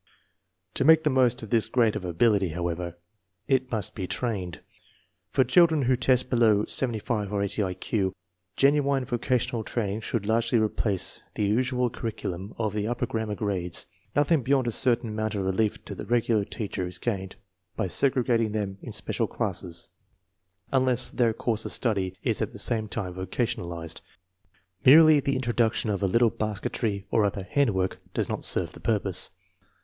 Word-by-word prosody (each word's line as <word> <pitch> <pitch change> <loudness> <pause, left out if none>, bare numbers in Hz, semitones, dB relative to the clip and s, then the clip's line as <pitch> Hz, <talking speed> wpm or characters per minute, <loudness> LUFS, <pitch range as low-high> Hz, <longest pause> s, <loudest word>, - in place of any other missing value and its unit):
To - - +1
make 160 +2 +6
the 150 - +2
most 125 -2 +2
of 110 - -9
this 115 -2 +3
grade 115 -4 +2
of - - -4
ability, 100 +2 +2
however, 85 +1 -4 0.5
it 130 -1 +1
must 110 -5 -1
be 95 -4 -4
trained. 95 -9 -3 0.7
(Fox 130 - +1
children 165 -5 +5
who 130 +1 +3
test 125 0 +2
below 110 -4 +3
75 110 -4 0
or 100 -1 0
80 100 +2 -1
I 95 -2 -1
Q, 95 0 -1 0.5
genuine 140 -1 +3
vocational 120 -1 -1
training 105 -2 -2
should 110 -1 -2
largely 115 +2 +2
replace 105 -3 0
the 105 - 0
usual 125 +3 +1
curriculum 100 -4 -5
of 110 -3 -1
the 105 0 -2
upper 120 +1 -1
grammar 110 -2 -3
grades. 95 -5 -2 0.3
1? 145 - +3
Nothing 150 0 +2
beyond 130 +1 +2
a 120 - 0
certain 120 0 +2
amount 110 0 -2
of 100 -2 -2
relief 100 +3 0
to - - -6
the - - -8
regular 115 -3 +2
teacher 100 -4 -4
is 90 0 -5
gained 95 -2 -3 0.4
by - - -1
segregating 120 -1 +1
them 100 -2 -3
in - - -8
special - - -1
classes, 85 -1 -3 0.8
unless 130 -2 +3
their 120 -3 +2
course 110 0 -1
of - - -5
study 95 -6 -1
is - - 0
at - - -2
the - - -8
same 110 -2 +2
time 95 -3 -4
vocationalized. 90 -4 -4 0.8
Merely 155 +2 +8
the 140 0 -1
introduction 120 -3 0
of 100 - -2
a 100 - +2
little 115 +4 +3
basketry 105 -1 -2
or 110 - +3
other 100 -1 -1
" - - -16
handwork 100 -10 +1
" - - -36
does - - 0
not - - -3
serve - - -1
the - - -13
purpose. 95 -4 0
110 Hz, 175 wpm, -26 LUFS, 100-125 Hz, 0.8 s, Merely